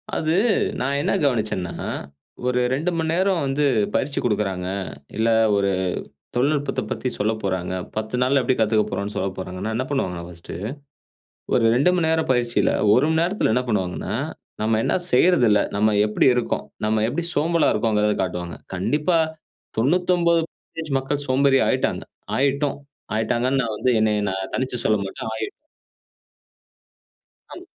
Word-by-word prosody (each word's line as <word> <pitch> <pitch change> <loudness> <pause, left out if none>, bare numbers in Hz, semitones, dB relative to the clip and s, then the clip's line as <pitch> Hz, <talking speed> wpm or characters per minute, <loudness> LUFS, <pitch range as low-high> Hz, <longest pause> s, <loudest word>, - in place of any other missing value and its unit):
அது 155 0 0 0.5
நான் 140 +2 0
என்ன - - 0
கவனிச்சன்னா, 110 -9 0 0.7
ஒரு 125 0 +1
2 155 +7 0
மணி 160 -1 0
நேரம் 185 -2 +1
வந்து 140 +2 +1 0.3
பயிற்சி 140 +1 0
கொடுக்குறாங்க. 100 -5 -1 0.5
இல்ல 115 +1 +2 0.3
ஒரு 100 -1 +2 0.7
தொழில்நுட்பத்தப் 140 +3 0
பத்தி 130 - -2
சொல்லப்போறாங்க 100 -4 -1 0.2
10 110 +2 -2
நாள்ல 135 +2 +3
எப்டி 130 - +2
கத்துக்க 110 -1 +3
போறோம், 100 +1 -3
சொல்லப்போறாங்கன்னா 95 +1 -3
என்ன 130 - -1
பண்ணுவாங்கன்னா 90 -11 -2
பர்ஸ்ட் 85 -1 -10 1.0
ஒரு 120 - +3
2 140 +9 +4
மணி 175 -3 +1
நேரம் 160 0 +1
பயிற்சியில 120 -1 +1 0.2
1 125 - +4
மணி 160 0 +2
நேரத்துல 180 - +1
என்ன 125 - +2
பண்ணுவாங்கன்னா, 95 -5 -1 0.5
நம்ம 110 0 +2
என்ன - - +1 0.2
செய்றதில்ல, 125 - +5 0.2
நம்ம 105 +1 +3
எப்படி 105 - +2
இருக்கோம், 125 - -1 0.2
நம்ம 110 0 +1
எப்படி 170 +8 -2
சோம்பலா 165 +2 +2
இருக்கோங்கிறத 105 -1 +2
காட்டுவாங்க. 90 -3 -4 0.2
கண்டிப்பா 150 - +1 0.6
99% 170 +2 0
மக்கள் 140 +2 -2
சோம்பேறி 135 +1 +4
ஆய்ட்டாங்க. - - 0 0.3
ஆய்ட்டோம் 140 +1 +1 0.4
ஆய்ட்டாங்கன்னு 120 +4 +1
நான் 115 -3 -2
வந்து 130 - +1
என்னை 110 -1 +3 0.2
நான் 95 0 -4
தனிச்சு 130 -1 -1
சொல்ல 110 -1 +3
மாட்டன் 110 +3 -6
ஆய் 110 - -3 2.1
ஆம். - - -10
125 Hz, 135 wpm, -23 LUFS, 105-145 Hz, 2.1 s, செய்றதில்ல